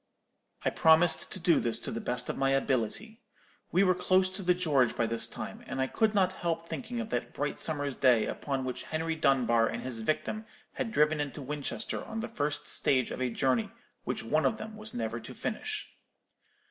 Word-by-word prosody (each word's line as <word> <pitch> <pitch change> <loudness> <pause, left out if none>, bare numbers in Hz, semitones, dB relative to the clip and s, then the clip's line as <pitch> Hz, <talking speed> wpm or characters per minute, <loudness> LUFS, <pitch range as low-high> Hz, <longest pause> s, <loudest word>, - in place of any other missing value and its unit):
"I - - +3
promised 160 +1 +4
to - - -4
do 170 -1 +4
this 115 -1 +2
to - - -3
the 115 - -3
best 125 0 0
of - - -2
my 135 0 +1
ability. 135 - -1 0.5
We 185 +3 +4
were 185 -1 +5
close 185 +1 +3
to 190 +2 -3
the 180 -1 +3
George 145 -9 +2
by 115 - +1
this 115 0 0
time, - - -7
and 135 - -4
I 130 - +3
could 220 - +1
not 185 -2 +4
help 170 -2 -2
thinking 240 +3 -4
of 230 -1 -4
that - - -2
bright 145 - -2
summer's 145 -4 -1
day 125 -4 +4
upon 135 -2 -3
which 125 - -4
Henry 160 +1 -1
Dunbar 120 -6 +3
and - - -4
his 125 -3 -4
victim 215 - -2 0.3
had 225 - -3
driven 150 -3 +3
into 145 0 -3
Winchester 145 +9 -4
on 225 0 -5
the 235 - -3
first 150 -9 -2
stage 130 -3 +2
of - - -4
a 130 - +1
journey 125 -1 +1 0.3
which - - -3
one 155 +7 +2
of 220 - -1
them 220 0 -7
was 215 0 -5
never 115 0 -2
to 120 +3 -10
finish. 425 - -3
150 Hz, 205 wpm, -30 LUFS, 130-185 Hz, 0.5 s, were